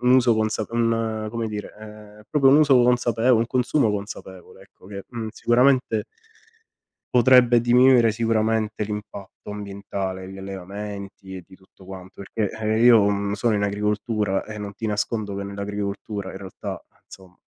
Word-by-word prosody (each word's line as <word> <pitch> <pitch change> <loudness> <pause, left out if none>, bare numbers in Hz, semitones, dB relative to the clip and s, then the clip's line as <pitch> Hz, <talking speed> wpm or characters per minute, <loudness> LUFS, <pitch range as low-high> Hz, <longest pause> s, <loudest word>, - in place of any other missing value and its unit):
un 125 +1 +3
uso 125 -3 +4
consap 110 0 -1
un 115 -2 -1
come 115 -1 -3
dire, 105 -1 -6
ehm, 105 -1 -13
proprio 140 -3 +3
un 135 - +7
uso 145 -3 +5
consapevole, 125 0 +2
un 115 - 0
consumo 125 +1 +1
consapevole 95 -2 -8
ecco, 95 - -20
che, 100 0 -8
mhmm, 115 -3 -5
sicuramente 125 -2 +2 1.1
potrebbe 125 -1 +6
diminuire 120 -1 +5
sicuramente 110 -1 0
l'impatto 105 -1 -8
ambientale, 100 -2 -5
gli 95 - -10
allevamenti 100 0 -8
e 95 - -8
di 95 - -17
tutto 95 0 -21
quanto, 95 0 -10
perché 105 +1 -3
eh, 110 0 -1
io, 120 -3 +7
mhmm, 100 0 -1
sono 110 +2 0
in 100 - 0
agricoltura 105 0 -1
e 105 0 -8
non 100 -1 -7
ti 115 - -5
nascondo 105 -1 -2
che 100 - -4
nell'agricoltura 100 0 -5
in - - -8
realtà 95 -1 -7 0.3
insomma, 95 -2 -15
105 Hz, 155 wpm, -23 LUFS, 100-115 Hz, 1.1 s, un